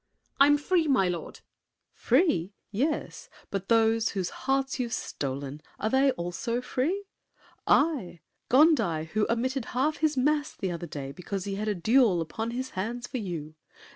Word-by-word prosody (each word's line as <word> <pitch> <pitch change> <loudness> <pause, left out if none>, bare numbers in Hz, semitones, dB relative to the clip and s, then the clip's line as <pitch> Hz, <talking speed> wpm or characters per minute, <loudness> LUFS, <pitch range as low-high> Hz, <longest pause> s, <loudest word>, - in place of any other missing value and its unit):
I'm 290 +1 +7
free, 330 +2 +1
my 255 -10 +3
lord! 175 -2 -5 0.5
SAVERNY. 265 +10 +3
Free! 185 - -1 0.2
Yes. 295 - -2 0.2
But 195 -1 -4
those 225 -1 +3
Whose 190 -3 -3
hearts 270 0 -1
you've 240 -2 -2
stolen, 140 +1 -4 0.2
are 215 - -1
they 270 +1 +4
also 175 +8 -3
free? 275 +10 -1 0.6
I? 270 - +2 0.3
Gondi, 225 - +4
who 215 -1 +2
omitted 255 +2 0
half 300 +4 +1
his 310 -2 +1
Mass 295 +3 +1
The 190 - -3
other 170 0 -5
day, 140 -3 -6
because 185 +4 -5
he 200 - -3
had 210 +2 -3
a 210 - +1
duel 220 0 +4
Upon 195 +8 -3
his 255 +2 -4
hands 235 +6 -3
for 255 - -4
you? 165 -7 -5
230 Hz, 160 wpm, -28 LUFS, 180-270 Hz, 0.6 s, I'm